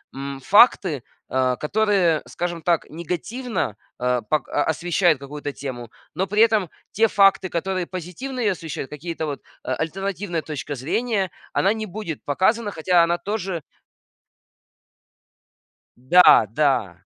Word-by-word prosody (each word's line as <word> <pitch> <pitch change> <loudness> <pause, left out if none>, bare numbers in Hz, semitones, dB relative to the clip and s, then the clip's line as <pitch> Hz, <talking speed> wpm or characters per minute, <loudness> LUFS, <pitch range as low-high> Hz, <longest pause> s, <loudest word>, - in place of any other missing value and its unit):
м, 135 0 -5
факты, 190 - +4 0.3
а, 130 -1 +1
которые, 190 -2 +2
скажем 175 -1 -4
так, 170 -1 +1
негативно, 180 - -3 0.2
э, 125 -1 +1
пок 155 -3 +1
а, 145 - 0
освещают 170 -1 +1
какую-то 145 +1 -6
тему. 125 -5 -7 0.3
Но 190 +3 0
при 210 +3 +1
этом 215 -7 +3 0.2
те 225 +1 +3
факты, 195 -2 +4
которые 185 +1 -2
позитивно 185 +9 -6
её 205 -5 +2
освещают, 160 -5 -6
какие-то 160 +2 -5
вот 145 -2 -5 0.2
альтернативная 175 +4 -3
точка 145 -2 -5
зрения, 195 - -1 0.2
она 195 +3 +2
не 220 -1 -4
будет 190 -5 -6
показана, 205 +8 +1
хотя 170 +1 +3
она 170 +1 +1
тоже 190 -5 -3 2.4
Да, 130 -2 +6
да. 120 - +1
170 Hz, 125 wpm, -23 LUFS, 145-195 Hz, 2.4 s, Да